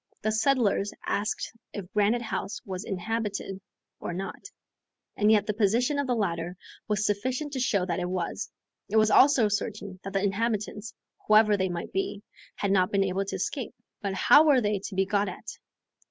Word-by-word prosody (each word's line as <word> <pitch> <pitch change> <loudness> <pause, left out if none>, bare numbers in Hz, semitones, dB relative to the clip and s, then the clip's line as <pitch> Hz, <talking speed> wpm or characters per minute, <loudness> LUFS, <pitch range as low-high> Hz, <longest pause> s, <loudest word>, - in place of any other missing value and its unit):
The 215 - +1
settlers 220 -3 +2
asked 205 +2 -2 0.2
if 200 -3 -7
Granite 210 +3 +2
House 205 -2 -4
was 190 0 -5
inhabited 200 -1 -3 0.4
or 175 - -4
not, 190 +2 -6 0.7
and 210 +1 +3
yet 215 -2 +4
the 210 - -1
position 235 +7 +2
of 285 - -1
the 250 - +1
ladder 175 -4 -2 0.3
was 210 -1 0
sufficient 255 +8 -1
to 265 - -2
show 200 -7 +1
that 175 -1 -2
it 180 0 -2
was; 185 +2 -3 0.4
it 210 - -3
was 215 0 +4
also 265 -4 +6
certain 205 -2 -3
that 195 - -6
the 195 0 +1
inhabitants, 210 +1 -2 0.3
whoever 215 0 +6
they 190 -1 0
might 175 -1 -5
be, 200 +1 -2 0.3
had 200 - -1
not 185 -2 +3
been 200 -1 +3
able 195 +1 -1
to 195 - -4
escape. 215 +6 -3 0.3
But 195 -2 -2
how 290 +10 +7
were 280 -4 +6
they 210 -3 0
to 195 - -6
be 190 0 +2
got 200 +1 +1
at? - - -10
205 Hz, 185 wpm, -27 LUFS, 195-220 Hz, 0.7 s, how